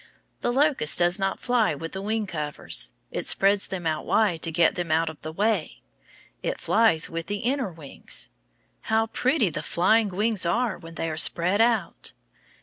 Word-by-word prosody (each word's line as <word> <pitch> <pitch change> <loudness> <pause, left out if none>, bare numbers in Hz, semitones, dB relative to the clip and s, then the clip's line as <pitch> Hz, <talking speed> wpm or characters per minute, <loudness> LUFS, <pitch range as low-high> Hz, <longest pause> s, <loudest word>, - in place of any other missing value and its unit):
The 240 - -1
locust 275 - +3
does 175 +2 +3
not 195 0 -1
fly 240 -9 +1
with 165 +3 -7
the 190 - -6
wing 215 +1 -2
covers. 150 - -1 0.2
It - - -3
spreads 200 +1 +2
them 180 -3 -6
out 155 -1 -1
wide 190 -7 +1
to 165 - -2
get 170 +1 +3
them 175 -3 -4
out 160 0 +1
of 155 - -18
the 155 - -6
way. 200 -1 -1 0.6
It - - -3
flies 215 -9 +2
with 165 0 -6
the 205 0 -4
inner 255 -5 -1
wings. 135 - -4 0.6
How 220 0 +2
pretty 245 - 0
the 150 - -4
flying 205 +7 +2
wings 210 +2 0
are 225 +6 0
when 165 0 -12
they 165 - -3
are 155 - -5
spread 180 +6 +4
out! 225 -6 0
190 Hz, 180 wpm, -25 LUFS, 165-220 Hz, 0.6 s, spread